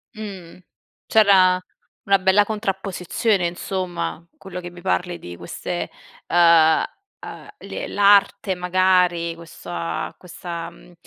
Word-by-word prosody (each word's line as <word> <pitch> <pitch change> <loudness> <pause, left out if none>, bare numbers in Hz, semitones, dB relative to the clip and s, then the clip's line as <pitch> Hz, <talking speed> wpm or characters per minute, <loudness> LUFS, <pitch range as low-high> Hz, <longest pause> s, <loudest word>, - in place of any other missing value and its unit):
Mh. 195 -6 -9 0.5
C'era 190 -4 +5 0.4
una 200 -2 +3
bella 190 +2 +4
contrapposizione, 195 -2 -1
insomma. 175 -2 -4
Quello 185 -2 -8
che 175 0 -7
mi 175 0 -13
parli 90 - -1
di 85 +1 -9
queste, - - -5 0.4
uhm 170 - +5 0.4
uhm, - - -10
le - - -6
l'arte 200 -1 +3
magari, 180 -2 +2
questo 170 +1 -12
a 170 -1 -3
questa, 170 -2 -7
mhmm, 175 +1 -18
180 Hz, 115 wpm, -22 LUFS, 170-195 Hz, 0.5 s, C'era